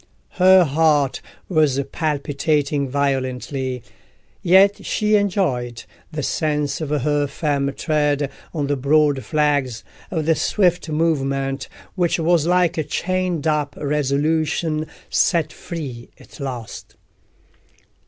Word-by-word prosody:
Her 185 0 +7
heart 150 -2 +2 0.3
was 155 -6 +2
palpitating 145 -2 -1
violently, 130 -2 -2 0.6
yet 190 +3 +4
she 210 0 +1
enjoyed 145 - 0 0.3
the 150 -2 -4
sense 150 -1 -1
of 155 - -3
her 145 0 +1
firm 140 -1 -1
tread 145 -2 0 0.2
on 150 -4 -2
the 145 +1 0
broad 140 0 +2
flags—of 145 - -2
the 165 - +4
swift 180 +1 +1
movement, 135 -4 -1 0.2
which 175 -3 +1
was 165 -1 +2
like 180 -1 +2
a - - +1
chained 180 +1 -2
up 150 -2 0
resolution 155 +2 0 0.2
set 165 -4 +2
free 140 -10 -7
at - - -16
last. 125 -5 -7
150 Hz, 105 wpm, -21 LUFS, 140-165 Hz, 0.6 s, Her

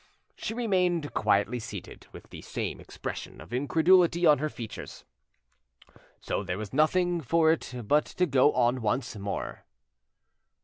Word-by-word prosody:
She 225 - -5
remained 180 -9 0
quietly 105 +3 +1
seated, 110 - -9
with - - -13
the - - -9
same - - -4
expression - - -7
of - - -11
incredulity 170 +6 +3
on 150 -3 +6
her 155 +1 -1
features. 115 -6 -8 1.1
So - - -2
there 90 -1 -3
was 105 +1 -7
nothing 175 +4 +2
for 160 +3 +3
it 160 - -2 0.2
but 150 +5 +3
to 180 - 0
go 140 -2 +4
on 125 0 +2
once 120 +4 -1
more. 100 -1 -5
150 Hz, 140 wpm, -28 LUFS, 120-170 Hz, 1.1 s, on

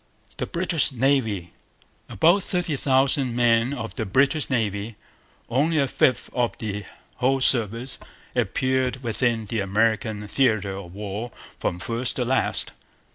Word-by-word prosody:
The - - -2
British 170 -4 +1
Navy. 115 -9 0 0.6
About 170 +5 +4
thirty 175 -4 -1
thousand 135 -1 +2
men 120 0 +3
of 120 -5 -5
the 110 - -1
British 140 - +2
Navy, 110 -3 -1 0.5
only 150 +7 +1
a 140 -2 +3
fifth 130 0 +2
of 120 -2 0
the 105 -2 -4 0.3
whole 135 +2 +2
service, 120 0 +1 0.4
appeared 130 +3 0
within 115 -1 0
the 110 +2 -2
American 105 +1 0
theatre 105 -6 +1
of 95 -2 -9
war 105 +3 -5 0.3
from 85 - -1
first 115 +7 -2
to 125 - 0
last. 130 +2 0
120 Hz, 130 wpm, -24 LUFS, 110-135 Hz, 0.6 s, About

